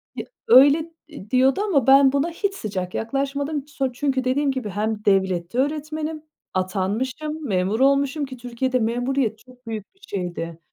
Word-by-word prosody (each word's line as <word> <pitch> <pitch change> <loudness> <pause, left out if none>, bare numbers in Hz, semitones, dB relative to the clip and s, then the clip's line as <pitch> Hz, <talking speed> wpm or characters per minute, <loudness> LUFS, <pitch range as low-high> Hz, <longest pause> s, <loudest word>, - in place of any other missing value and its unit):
bir - - -6 0.2
öyle 295 - +6 0.2
,eee, 280 -10 -11
diyordu 260 +7 +3
ama 300 - +1
ben 270 0 +7
buna 280 +4 +1
hiç 395 +4 -2
sıcak 185 - -4
yaklaşmadım. 280 +4 -2
So 270 -3 -2
çünkü 265 0 -1
dediğim 275 +2 +1
gibi, 255 -6 -4
hem 210 +2 -3
devlette 190 0 +1
öğretmenim, 305 +2 -2 0.3
atanmışım, 250 +12 -2
memur 195 +3 0
olmuşum 280 +2 +2
ki 260 -1 -9
Türkiye'de 250 +1 -1
memuriyet 240 0 0
çok 250 -1 -20
büyük 215 - -6
bir - - -31
şeydi. 175 -3 -4
260 Hz, 150 wpm, -23 LUFS, 215-285 Hz, 0.3 s, ben